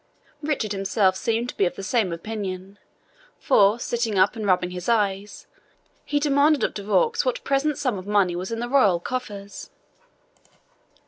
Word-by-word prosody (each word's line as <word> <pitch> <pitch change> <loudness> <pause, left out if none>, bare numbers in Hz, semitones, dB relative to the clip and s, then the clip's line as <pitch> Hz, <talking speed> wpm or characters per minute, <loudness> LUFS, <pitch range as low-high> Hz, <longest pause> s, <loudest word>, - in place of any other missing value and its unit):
Richard 290 -8 -2
himself 195 -1 +1
seemed 230 +4 -1
to - - -7
be 195 - +3
of - - -5
the 195 - -7
same 200 -2 0
opinion, 195 +1 -6 0.6
for, 210 -5 +4
sitting 235 -4 -2
up 190 +5 +3
and 215 -2 -4
rubbing 180 -1 +2
his 180 +2 -5
eyes, 205 -3 -1 0.6
he 290 - 0
demanded 290 +1 +3
of - - 0
De 205 - -6
Vaux 455 - +2
what - - -2
present 280 +1 0
sum 250 -8 -1
of 185 - -11
money 200 -4 +2
was 185 +4 -5
in 230 - -2
the 240 - -3
royal 215 -10 +3
coffers. 205 -2 -6
210 Hz, 170 wpm, -24 LUFS, 190-255 Hz, 0.6 s, for